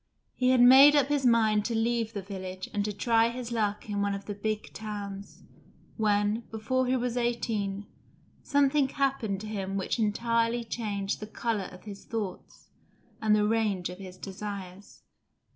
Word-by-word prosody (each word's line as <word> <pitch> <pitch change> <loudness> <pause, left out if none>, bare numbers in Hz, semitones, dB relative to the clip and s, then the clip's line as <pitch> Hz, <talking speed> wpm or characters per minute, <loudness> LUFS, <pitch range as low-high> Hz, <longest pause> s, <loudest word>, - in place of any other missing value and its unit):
He 255 0 +1
had 255 -1 +5
made 270 +4 +9
up 285 -1 +3
his 285 -3 +2
mind 220 -3 +3
to 235 - -1
leave 230 0 0
the 200 -2 -4
village 190 -1 -7
and 205 -1 0
to 210 - -1
try 230 +2 +2
his 240 0 -6
luck 210 -3 -1
in 205 -1 -2
one 200 0 0
of 200 - -8
the 205 - -4
big 215 +1 -4
towns, 200 -2 -7 0.5
when, 210 0 +1
before 250 +4 -1
he 255 - +2
was 245 0 -2
eighteen, 215 -4 -1 0.6
something 285 -1 +2
happened 260 -9 -1
to 215 - -7
him 195 -2 -3
which 195 +5 -2
entirely 230 +2 +1
changed 205 -4 -3
the 210 - -7
colour 220 -2 -2
of 180 - -13
his 200 -2 -9
thoughts 210 -5 -6 0.5
and 215 -1 +4
the 210 0 +2
range 210 -5 0
of 180 - -10
his 185 -2 -9
desires. 195 0 -8
215 Hz, 170 wpm, -28 LUFS, 200-235 Hz, 0.6 s, made